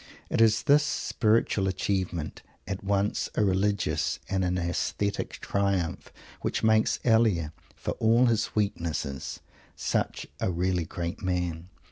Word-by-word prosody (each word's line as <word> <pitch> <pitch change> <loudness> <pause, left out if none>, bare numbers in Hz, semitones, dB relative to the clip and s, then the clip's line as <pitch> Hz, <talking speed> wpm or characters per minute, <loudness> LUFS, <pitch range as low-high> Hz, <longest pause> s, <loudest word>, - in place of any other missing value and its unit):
It - - +2
is 110 -1 +4
this 145 +1 +6
spiritual 110 -7 +1
achievement 95 -4 -2 0.3
at 100 0 -4
once 100 +1 0
a 105 - +3
religious 100 0 +1
and 95 -1 0
an 90 0 0
aesthetic 90 +3 -1
triumph 100 -4 -1 0.3
that - - -1
makes 110 0 +3
Elia, 110 -10 +3 0.2
for - - -3
all 115 +3 +5
his 115 -3 +1
weaknesses, 85 -9 -2 0.3
such - - -1
a - - 0
really 90 0 0
great 85 +5 -5
man. 90 -3 -2
95 Hz, 125 wpm, -28 LUFS, 90-110 Hz, 0.3 s, this